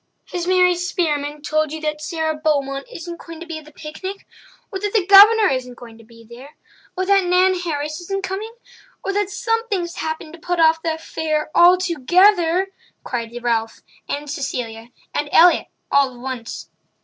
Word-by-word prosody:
Has 350 -1 -3
Mary 365 -1 +4
Spearman 300 -5 -2
told 310 -1 0
you 315 - -5
that 305 -1 -3
Sara 320 -1 -2
Beaumont 280 -3 -1
isn't 340 0 -8
going 330 -1 -10
to 340 - -8
be 330 -2 -6
at 310 - -16
the 305 - -15
picnic?" 375 +7 -8 0.5
"Or 385 - -4
that 410 +1 -3
the 420 -5 +2
Governor 415 +2 +8
isn't 255 -2 -3
going 230 -2 -13
to - - -15
be 230 +1 -17
there?" 255 +5 -13 0.4
"Or 370 - 0
that 390 -1 +3
Nan 365 +1 +4
Harris 305 -2 -3
isn't 390 +2 -4
coming?" 390 +4 -4 0.5
"Or 395 - -2
that 410 -1 0
something's 425 -5 -2
happened 315 0 -5
to 335 - -11
put 355 +2 -2
off 320 0 +4
the 325 -1 -1
affair 310 -1 -3
altogether?" 355 +1 +4 0.3
cried 230 -2 -4
Ralph 225 -2 -1 0.3
and 290 +1 -3
Cecilia 245 -5 -5 0.2
and 290 - -2
Elliott 345 +1 +5 0.2
all 275 -2 +3
at - - -14
once. 250 -2 -6
320 Hz, 175 wpm, -20 LUFS, 285-365 Hz, 0.5 s, Governor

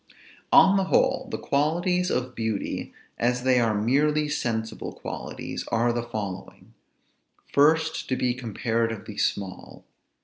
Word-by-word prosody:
On 195 +1 +7
the 195 - +1
whole, - - +2
the - - -3
qualities 175 +5 +1
of 125 0 -1
beauty, 110 -4 -3 0.3
as 125 +1 +1
they 130 -1 +4
are 110 -3 +1
merely 150 +7 +2
sensible 110 -5 -3
qualities, - - -6
are 120 +1 +1
the 120 - -1
following: 105 -5 -7 0.8
First, 160 +3 +3
to 130 - +1
be 125 -1 0
comparatively 115 -2 -2
small. 95 -2 -3
120 Hz, 125 wpm, -26 LUFS, 110-150 Hz, 0.8 s, On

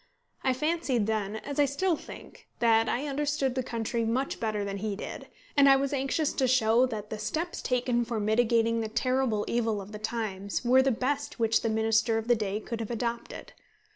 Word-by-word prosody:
I 260 - +3
fancied 290 -5 0
then 215 -1 -1
as 280 +6 -5
I 290 - +6
still 325 +6 0
think - - -12
that 225 -1 +3
I 265 +5 -1
understood 285 -2 -1
the 260 - -1
country 230 -1 -2
much 250 +5 -1
better 215 -2 -1
than 200 0 -4
he 210 0 -3
did; - - -7 0.3
and 280 -1 +6
I 270 - +8
was 275 +1 0
anxious 280 +3 0
to 265 - +1
show 245 0 +4
that 215 -3 -6
the 215 - -4
steps 315 +12 -3
taken 245 -1 +1
for 230 -1 -3
mitigating 230 +1 +2
the 220 - -3
terrible 245 -2 0
evil 225 -3 0
of 200 +1 -9
the 210 - -7
times 215 -1 -3
were 255 +2 +6
the 270 - +2
best 270 +4 -2
which 225 -1 +2
the 225 - 0
Minister 225 +1 +2
of 225 0 -3
the 240 - +5
day 210 -2 -2
could 230 +1 -6
have 225 - -4
adopted. 235 0 -4
235 Hz, 200 wpm, -28 LUFS, 220-265 Hz, 0.3 s, I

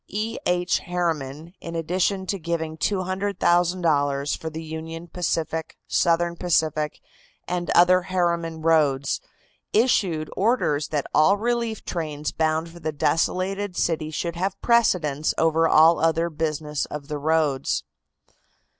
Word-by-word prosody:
E. 220 +3 -3
H. 180 0 +1
Harriman, 165 -3 -3
in 170 0 -6
addition 185 +4 0
to 195 +1 -2
giving 160 -1 -3
$200,000 175 -6 +1
for 160 - -6
the 160 +1 -7
Union 160 +1 -7
Pacific, 160 -2 -3
Southern 170 0 +2
Pacific 155 -3 0 0.5
and 175 0 -2
other 180 +1 +6
Harriman 170 -3 -1
roads, 145 -4 +2 0.5
issued 190 -9 +2
orders 190 - +1
that 145 -3 -2
all 190 +7 +5
relief 235 0 -2
trains 155 -3 -3
bound 160 +1 0
for 170 +1 -13
the 160 -1 -3
desolated 185 +5 0
city 160 -2 0
should 170 +2 -3
have 185 +3 -2
Precedence 165 - +2
over 165 0 +3
all 160 +2 +6
other 165 +1 +1
business 150 -1 -2
of 145 -2 -7
the 150 -1 -4
roads. 150 -3 +1
165 Hz, 125 wpm, -24 LUFS, 155-180 Hz, 0.5 s, other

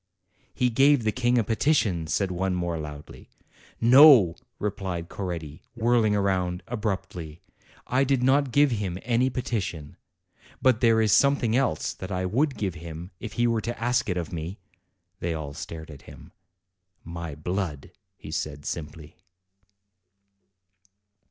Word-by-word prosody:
"He 125 -1 +1
gave 135 +1 +4
the 110 - +1
King 125 +1 +1
a 115 - +3
petition," 110 - +1
said 95 +3 0
one, 90 +1 -1
more 85 -2 -2
loudly. 75 -1 -9 0.5
"No," 120 - +8 0.2
replied 95 -5 -4
Coretti, 85 -5 -6
whirling 115 -2 +2
round 90 -3 0
abruptly; 95 -8 -4 0.4
T 130 +2 +2
did 135 -2 +1
not 135 +1 +3
give 145 +1 +4
him 100 -6 -2
any 125 +2 +2
petition. 95 - -4 0.6
But 130 -4 +3
there 115 -2 +4
is 110 -2 +3
some 140 0 +5
thing 115 -4 -1
else 125 - 0
that 95 +1 -8
I 95 0 -1
would 135 +9 0
give 95 -4 -2
him, 85 +2 -9
if 110 - -7
he 120 - +1
were 115 -2 +1
to 120 0 -5
ask 120 -1 0
it 90 - -1
of 85 -1 -4
me." 85 +4 -5 0.6
They 85 -1 -2
all 75 -3 -6
stared 80 +1 -8
at 70 -2 -12
him. - - -14 0.7
"My 85 -2 -6
blood," 80 -2 -4 0.3
he - - -10
said 75 -1 -4
simply. 80 -1 -7
100 Hz, 145 wpm, -26 LUFS, 85-120 Hz, 0.7 s, No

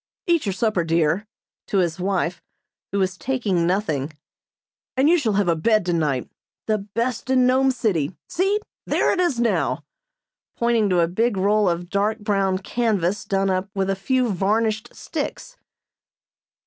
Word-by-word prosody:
"Eat 335 - +2
your 195 - 0
supper, 210 -3 +1
dear," 165 +4 +1 0.4
to 200 - 0
his 175 -2 +1
wife, 180 -2 -1 0.5
who 200 - -1
was 185 -2 0
taking 205 -10 0
nothing, 160 -7 -1 0.9
"and 270 +2 +4
you 340 - +6
shall 225 -8 0
have 200 -1 +1
a 170 - +3
bed 215 +4 +2
tonight 155 -7 0 0.4
the 215 -1 +1
best 230 +5 -3
in 255 -1 +4
Nome 260 +1 +4
City. 190 - 0
See! 390 +4 +1 0.3
There - - +2
it - - -1
is 345 -9 +1
now," 235 -1 +1 0.7
pointing 235 -3 +2
to 180 -2 +3
a 165 - +3
big 220 +5 0
roll 205 +1 +3
of 175 +1 -2
dark 205 +2 +1
brown 195 -3 0
canvas 205 -2 0
done 195 0 +1
up 185 +1 -1
with 195 0 0
a - - 0
few 250 +4 0
varnished 215 +3 0
sticks. - - -5
200 Hz, 160 wpm, -23 LUFS, 180-235 Hz, 0.9 s, you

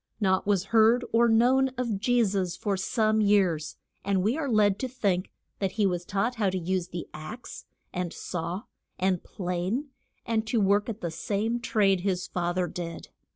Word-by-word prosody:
Naught 190 -2 +1
was 200 -3 +2
heard 230 +2 +5
or 235 +1 +5
known 255 +4 +4
of 235 -5 -1
Je 245 +3 +3
sus 190 -3 -1
for 200 -1 -1
some 215 +3 +1
years, 185 -7 +2 0.3
and 195 -2 +1
we 220 +6 +2
are 300 -3 -2
led 210 -3 +3
to 260 - -1
think 200 -7 -1 0.3
that 195 -2 -1
he 210 -2 +1
was 175 -2 0
taught 215 +7 -1
how 205 -3 +2
to 185 - -2
use 180 0 -1
the 175 -1 -6
axe, 155 +11 -8 0.3
and 180 -2 -2
saw, 175 +2 -4 0.3
and 185 -1 0
plane, 185 - -3 0.4
and 220 -1 0
to 230 0 +1
work 205 +2 +2
at 225 -1 -5
the 170 - -3
same 215 +7 -1
trade 200 -5 +2
his 185 -1 -1
fa 175 -1 -2
ther 180 -1 +1
did. 170 0 -6
200 Hz, 185 wpm, -27 LUFS, 180-225 Hz, 0.4 s, heard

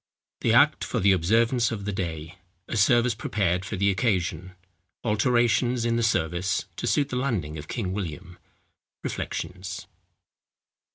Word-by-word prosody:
THE - - +1
ACT - - +5
FOR - - -2
THE 100 +1 +4
OBSERVANCE 115 +7 +3
OF 100 -3 -4
THE 105 - -1
DAY—A 90 +1 -6
SERVICE 120 +3 +4
PREPARED 95 -5 -1
FOR 105 - -4
THE 100 +1 +3
OCCASION—ALTERATIONS 105 - 0
IN 115 0 +1
THE 120 - +1
SERVICE 95 -3 0
TO - - -3
SUIT 145 -2 +2
THE 125 - -2
LANDING 95 - -2
OF 75 - -9
KING 95 -6 -3
WILLIAM—REFLECTIONS. 90 +1 -7
95 Hz, 125 wpm, -26 LUFS, 90-115 Hz, -, ACT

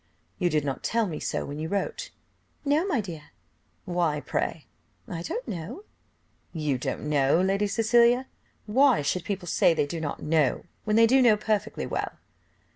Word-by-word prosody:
"You 180 -2 +2
did 150 -3 0
not 135 -2 -3
tell 230 -1 +1
me 160 -6 -4
so - - -2
when 145 +1 -6
you 160 +1 -3
wrote!" 205 - -2 0.6
"No, 300 +6 +2
my 285 - +1
dear." 165 -7 -8 0.6
"Why 170 -4 0
pray?" 155 +1 -3 0.4
"I 165 - -5
don't 470 - -4
know." 195 - -6 0.7
"You 150 -6 -1
don't 130 - -3
know, 145 +1 +3
Lady 195 +2 +1
Cecilia! 235 +4 +4 0.4
why 255 - +4
should 175 +5 -1
people 195 -2 -4
say 165 - +3
they 145 - +1
do 160 +3 -5
not 145 - -3
know, 150 -4 +1 0.2
when 215 -1 +1
they 230 +1 +7
do 260 +3 +5
know 230 -4 +5
perfectly 215 -1 -1
well?" - - -3
185 Hz, 170 wpm, -27 LUFS, 155-230 Hz, 0.7 s, they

